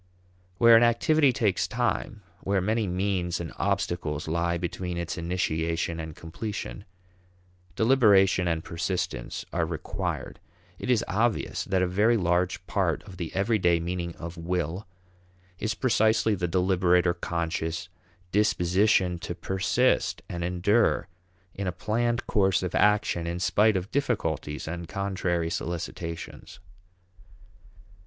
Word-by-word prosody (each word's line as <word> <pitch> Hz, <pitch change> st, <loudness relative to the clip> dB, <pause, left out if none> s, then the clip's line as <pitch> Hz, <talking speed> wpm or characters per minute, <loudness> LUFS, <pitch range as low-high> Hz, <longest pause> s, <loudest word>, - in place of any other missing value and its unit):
Where 115 Hz, +1 st, +7 dB
an 115 Hz, -, +7 dB
activity 135 Hz, +5 st, +4 dB
takes 115 Hz, -7 st, +1 dB
time, 115 Hz, -3 st, -2 dB, 0.2 s
where 100 Hz, 0 st, 0 dB
many 110 Hz, +3 st, 0 dB
means 90 Hz, -1 st, -1 dB
and 85 Hz, -1 st, -6 dB
obstacles 85 Hz, -6 st, -1 dB
lie 85 Hz, +1 st, 0 dB
between 90 Hz, +1 st, -4 dB
its 85 Hz, -1 st, -3 dB
initiation 85 Hz, -1 st, -1 dB
and 80 Hz, -1 st, -6 dB
completion, 100 Hz, +3 st, -6 dB, 0.9 s
deliberation 100 Hz, -7 st, +4 dB
and 80 Hz, -1 st, -1 dB
persistence 85 Hz, -6 st, -3 dB
are -, -, +1 dB
required. -, -, -4 dB, 0.4 s
It -, -, -5 dB
is 125 Hz, -4 st, +3 dB
obvious 110 Hz, +3 st, 0 dB
that 95 Hz, -1 st, +1 dB
a -, -, +2 dB
very 105 Hz, +6 st, +3 dB
large 90 Hz, 0 st, 0 dB
part 95 Hz, -5 st, 0 dB
of 95 Hz, -4 st, -12 dB
the 85 Hz, -3 st, -4 dB
everyday 95 Hz, -4 st, +2 dB
meaning 85 Hz, 0 st, -3 dB
of 85 Hz, +1 st, -8 dB
will 90 Hz, +2 st, -3 dB, 0.7 s
is 110 Hz, 0 st, -1 dB
precisely 110 Hz, -2 st, +2 dB
the 90 Hz, -3 st, -1 dB
deliberate 90 Hz, 0 st, +2 dB
or 85 Hz, -, +3 dB
conscious 85 Hz, -1 st, -3 dB, 0.4 s
disposition 95 Hz, -2 st, +2 dB
to -, -, -5 dB
persist 95 Hz, +7 st, +1 dB
and 85 Hz, -1 st, -4 dB
endure 95 Hz, +6 st, +2 dB, 0.4 s
in 100 Hz, -1 st, -4 dB
a -, -, 0 dB
planned 115 Hz, +6 st, -1 dB
course 95 Hz, -3 st, +2 dB
of 90 Hz, -, -3 dB
action 105 Hz, -5 st, +2 dB
in 85 Hz, +1 st, -2 dB
spite 105 Hz, +4 st, +3 dB
of 95 Hz, +3 st, -5 dB
difficulties 80 Hz, -, -2 dB
and 85 Hz, +1 st, -5 dB
contrary 90 Hz, -3 st, -1 dB
solicitations. 85 Hz, -1 st, -5 dB
90 Hz, 125 wpm, -27 LUFS, 85-105 Hz, 0.9 s, Where